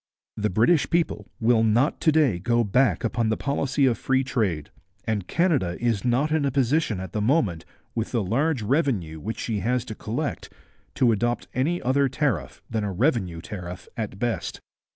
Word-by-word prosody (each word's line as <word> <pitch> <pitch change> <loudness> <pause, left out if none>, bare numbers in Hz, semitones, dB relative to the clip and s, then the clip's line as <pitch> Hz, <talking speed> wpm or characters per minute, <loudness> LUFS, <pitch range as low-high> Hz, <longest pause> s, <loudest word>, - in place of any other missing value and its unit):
The 105 0 0
British 120 - +3
people 165 - 0
will 115 0 +3
not 120 +7 +2
to 160 - +4
day 145 - +3
go 120 +4 +2
back 110 -3 +2
upon 115 -1 0
the 110 - 0
policy 140 0 0
of 125 -3 +2
free 135 0 +1
trade, 100 - -1 0.3
and 105 -4 -2
Canada 145 - +1
is 115 -4 0
not 125 +5 +1
in 155 -2 +2
a 140 - +2
position 135 - +1
at 95 -2 -6
the 105 - -1
moment, 105 - +1 0.3
with 115 -1 -2
the 115 -4 0
large 130 - 0
revenue 105 - 0
which 110 +8 -4
she 110 -3 -2
has 125 +2 0
to - - -6
collect, - - -4 0.4
to 120 -2 +4
adopt 120 +3 0
any 155 +8 0
other 135 +2 +2
tariff 135 +2 -2
than 110 -2 -2
a 100 - -2
revenue 95 - 0
tariff 90 -1 -7
at 105 -4 -4
best.' 120 +2 -2
120 Hz, 180 wpm, -25 LUFS, 105-135 Hz, 0.4 s, to